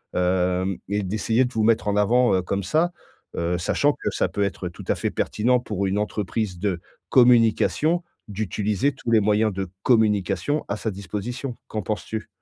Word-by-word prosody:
Hem, 90 +1 +1
et 105 +1 0
d'essayer 110 +5 +1
de 125 - -5
vous 110 - +1
mettre 110 -1 +2
en 100 - 0
avant 120 +4 +3
heu, 95 - +2
comme 100 +2 -2
ça, 160 - +1 0.5
heu, 85 +1 0
sachant 145 +11 +2
que - - -3
ça - - 0
peut 100 - -1
être 95 -2 -3
tout 85 - -12
à - - +2
fait - - -2
pertinent 125 +4 +1
pour 105 -5 -3
une 95 - -1
entreprise 105 -2 -2
de 95 -2 -1 0.3
communication, 125 +7 +4 0.3
d'utiliser 105 +4 -1
tous 120 -2 -5
les 110 - +5
moyens 105 +1 +2
de 95 -1 -4
communication, 105 - +2
à 100 - 0
sa 110 - -3
disposition. 105 +7 -5
Qu'en 110 - -3
penses-tu? 105 +2 -4
105 Hz, 180 wpm, -24 LUFS, 95-115 Hz, 0.5 s, les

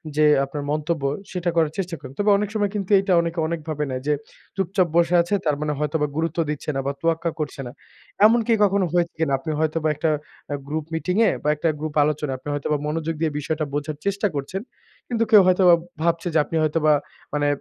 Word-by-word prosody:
যে 155 - +4 0.2
আপনার 145 +1 -5
মন্তব্য 155 0 -1 0.3
সেটা 180 -2 -1
করার 160 -2 +2
চেষ্টা 180 -3 -2
করেন। 130 -2 -10
তবে 205 +1 +2
অনেক 205 0 -1
সময় 205 -1 +1
কিন্তু 200 -1 -3
এটা 195 -1 +1
অনেকে 170 0 -3
অনেকভাবে 155 -2 -3
নেয় 130 0 -3
যে 150 - +3 0.4
চুপচাপ 190 -1 +1
বসে 170 +1 +3
আছে 175 +4 -3
তার 150 - +2
মানে 150 0 -1
হয়তোবা 150 0 0
গুরুত্ব 165 0 -1
দিচ্ছে 150 0 -4
না 135 - 0
বা - - +1
তোয়াক্কা 165 0 +1
করছে 145 -2 -4
না। - - -7 0.5
এমনকি 230 +1 +4
কখনো 195 -1 +3
হয়েছে 170 -1 +1
কিনা? 160 -4 +1
আপনি 155 +4 -4
হয়তোবা 160 0 0
একটা 155 +2 0 0.4
আ - - 0
গ্রুপ 155 0 -3
মিটিং 180 +3 -1
এ - - +5
বা 150 - +1
একটা 155 +2 0
গ্রুপ 155 -1 -4
আলোচনায় 145 -2 -1
আপনি 145 - -7
হয়তোবা 145 +1 -1
মনোযোগ 160 +1 -2
দিয়ে 160 -2 +1
বিষয়টা 155 +1 -2
বোঝার 145 +1 -3
চেষ্টা 200 +1 +1
করছেন। 145 +8 -3 0.5
কিন্তু 230 -2 0
কেউ 210 - +9
হয়তোবা 180 -1 +6 0.3
ভাবছে 170 +1 +1
যে 160 - +3
আপনি 165 - -6
হয়তোবা 155 0 +3 0.4
মানে 145 0 +1
160 Hz, 205 wpm, -23 LUFS, 150-180 Hz, 0.5 s, কেউ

